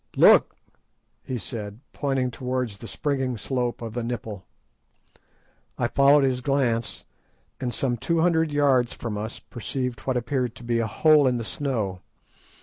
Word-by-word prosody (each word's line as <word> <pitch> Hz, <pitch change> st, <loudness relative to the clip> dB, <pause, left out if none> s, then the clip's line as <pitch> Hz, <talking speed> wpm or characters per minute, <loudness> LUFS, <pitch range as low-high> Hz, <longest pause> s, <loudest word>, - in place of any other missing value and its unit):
"Look!" -, -, +6 dB, 0.7 s
he 130 Hz, -, -4 dB
said, 105 Hz, -3 st, -7 dB
pointing 135 Hz, -3 st, 0 dB
towards 125 Hz, -4 st, -3 dB
the 115 Hz, -, -8 dB
springing 135 Hz, -4 st, -2 dB
slope 120 Hz, +1 st, -2 dB
of 115 Hz, -2 st, -5 dB
the 120 Hz, -, -2 dB
nipple. 110 Hz, -4 st, -5 dB, 1.3 s
I -, -, 0 dB
followed 140 Hz, +1 st, +5 dB
his 130 Hz, -2 st, +1 dB
glance, 125 Hz, -4 st, 0 dB, 0.5 s
and 125 Hz, -2 st, -2 dB
some 120 Hz, +1 st, -1 dB
two 165 Hz, +8 st, 0 dB
hundred 165 Hz, -2 st, +2 dB
yards 135 Hz, -4 st, +3 dB
from 115 Hz, -3 st, -5 dB
us 110 Hz, +2 st, -5 dB
perceived 125 Hz, +2 st, -4 dB
what 130 Hz, -2 st, -1 dB
appeared 125 Hz, -1 st, -1 dB
to -, -, -12 dB
be 120 Hz, 0 st, 0 dB
a 115 Hz, -, 0 dB
hole 150 Hz, +5 st, +5 dB
in 125 Hz, -1 st, +2 dB
the 115 Hz, -, -3 dB
snow. 110 Hz, -10 st, -2 dB
125 Hz, 150 wpm, -25 LUFS, 115-135 Hz, 1.3 s, Look